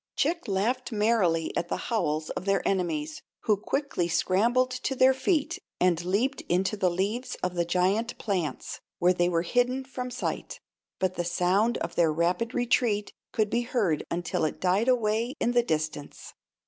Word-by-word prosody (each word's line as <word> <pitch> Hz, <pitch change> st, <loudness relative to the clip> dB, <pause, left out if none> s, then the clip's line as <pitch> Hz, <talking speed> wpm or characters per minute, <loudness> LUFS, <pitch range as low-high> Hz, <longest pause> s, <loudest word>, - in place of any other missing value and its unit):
Chick 335 Hz, 0 st, 0 dB
laughed 235 Hz, +6 st, -1 dB
merrily 205 Hz, -7 st, +1 dB
at 175 Hz, -, -1 dB
the -, -, -2 dB
howls 155 Hz, -9 st, -1 dB
of 185 Hz, -, -5 dB
their 195 Hz, -1 st, +1 dB
enemies, 160 Hz, -5 st, -1 dB, 0.2 s
who 215 Hz, -, +3 dB
quickly 210 Hz, -, -2 dB
scrambled 230 Hz, +9 st, +2 dB
to 255 Hz, +1 st, -2 dB
their 260 Hz, +1 st, +5 dB
feet 315 Hz, +5 st, 0 dB, 0.2 s
and 175 Hz, -2 st, +2 dB
leaped 225 Hz, +10 st, 0 dB
into 185 Hz, +4 st, +1 dB
the 190 Hz, -3 st, +2 dB
leaves 200 Hz, +8 st, -2 dB
of 180 Hz, 0 st, 0 dB
the 175 Hz, -1 st, 0 dB
giant 190 Hz, +7 st, +1 dB
plants, 185 Hz, -7 st, -3 dB, 0.2 s
where 180 Hz, +1 st, +4 dB
they 175 Hz, -1 st, +2 dB
were 170 Hz, -1 st, +1 dB
hidden 245 Hz, +7 st, +1 dB
from 250 Hz, -1 st, -5 dB
sight. 250 Hz, +1 st, -4 dB, 0.4 s
But 185 Hz, -1 st, -1 dB
the 175 Hz, -, 0 dB
sound 180 Hz, +6 st, +2 dB
of 170 Hz, -, -4 dB
their 165 Hz, -2 st, +3 dB
rapid 175 Hz, +9 st, 0 dB
retreat 235 Hz, -4 st, +1 dB, 0.2 s
could 215 Hz, -2 st, 0 dB
be 240 Hz, -, +2 dB
heard 225 Hz, -, 0 dB
until 170 Hz, -1 st, -2 dB
it 155 Hz, -, -1 dB
died 190 Hz, +6 st, +2 dB
away 235 Hz, +1 st, +1 dB
in 240 Hz, -, +1 dB
the 245 Hz, 0 st, +4 dB
distance. 155 Hz, -7 st, -4 dB
200 Hz, 170 wpm, -27 LUFS, 175-245 Hz, 0.4 s, their